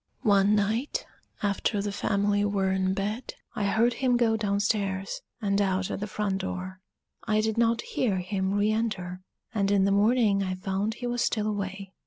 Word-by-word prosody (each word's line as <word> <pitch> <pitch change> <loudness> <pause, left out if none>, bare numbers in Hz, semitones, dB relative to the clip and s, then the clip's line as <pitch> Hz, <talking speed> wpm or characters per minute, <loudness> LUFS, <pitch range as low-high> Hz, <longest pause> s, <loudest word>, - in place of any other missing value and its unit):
One 200 -2 +4
night, 225 - 0 0.4
after 205 +1 0
the 205 0 -2
family 205 0 +1
were 200 -2 +1
in 190 0 +1
bed, 210 +6 -3 0.2
I 205 - -1
heard 230 +4 +3
him 250 0 +2
go 230 -2 +3
down 205 -2 0
stairs 195 -2 -1 0.2
and 200 -2 +1
out 190 -1 0
at - - -3
the 210 - -3
front 200 -1 -1
door; 185 0 -5 0.5
I 215 -1 +2
did 220 0 0
not 230 0 +2
hear 210 -7 0
him 190 +1 -1
re 205 +1 +2
enter, 190 -5 -2 0.3
and 200 -3 +1
in 200 -1 +4
the 200 - +2
morning 210 0 +3
I 185 -1 -1
found 195 +3 -2
he 245 - -6
was 245 0 -1
still 215 -4 +1
away. 200 -2 -4
205 Hz, 185 wpm, -27 LUFS, 195-220 Hz, 0.5 s, One